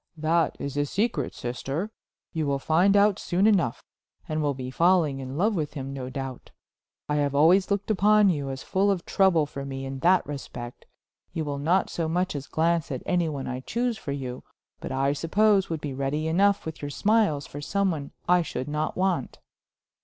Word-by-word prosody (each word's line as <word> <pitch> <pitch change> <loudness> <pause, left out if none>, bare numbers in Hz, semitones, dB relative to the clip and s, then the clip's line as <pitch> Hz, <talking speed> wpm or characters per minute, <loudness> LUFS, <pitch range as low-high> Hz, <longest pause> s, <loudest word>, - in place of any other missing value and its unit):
"That 160 +2 +1
is 140 0 -5
a 145 0 +1
secret, 195 - -1
sister. 135 - -4 0.4
You 160 -2 -1
will 140 -1 +1
find 175 +8 +3
out 205 0 +4
soon 185 +3 +1
enough, 190 - +2 0.4
and 155 0 -1
will 145 -2 0
be 130 -1 -6
falling 165 -3 +3
in 130 +1 -6
love 210 +6 +2
with 155 -4 -3
him, 135 -1 -5
no 130 -2 -5
doubt. 135 -2 -6 0.6
I 150 - 0
have 140 -1 0
always 175 +6 +5
looked 200 +1 0
upon 210 +1 +5
you 145 -6 -1
as 135 0 -5
full 195 +2 +1
of 190 -4 0
trouble 185 -6 +3
for 140 -1 -7
me 135 -1 -5
in 135 0 -5
that 180 +6 +4
respect; 125 -4 -8 0.5
you 160 - -2
will 140 -1 -3
not 175 +6 +1
so 165 -2 -2
much 180 +1 -1
as 140 0 -5
glance 165 -1 0
at 130 - -4
anyone 160 -6 0
I 125 0 -4
choose 235 - -1
for 145 - -6
you, 130 -3 -5 0.4
but - - -6
I 135 +1 +1
suppose 195 +6 +2
would 160 -2 -3
be 145 -3 -4
ready 140 +4 -2
enough 200 +5 +2
with 160 0 -6
your 145 - -4
smiles 200 -3 +2
for 145 - -8
some 200 +5 +1
one 145 -4 -5 0.2
I 180 0 +5
should 130 -5 -4
not 150 +1 -2
want." 185 -7 0
155 Hz, 200 wpm, -26 LUFS, 140-185 Hz, 0.6 s, always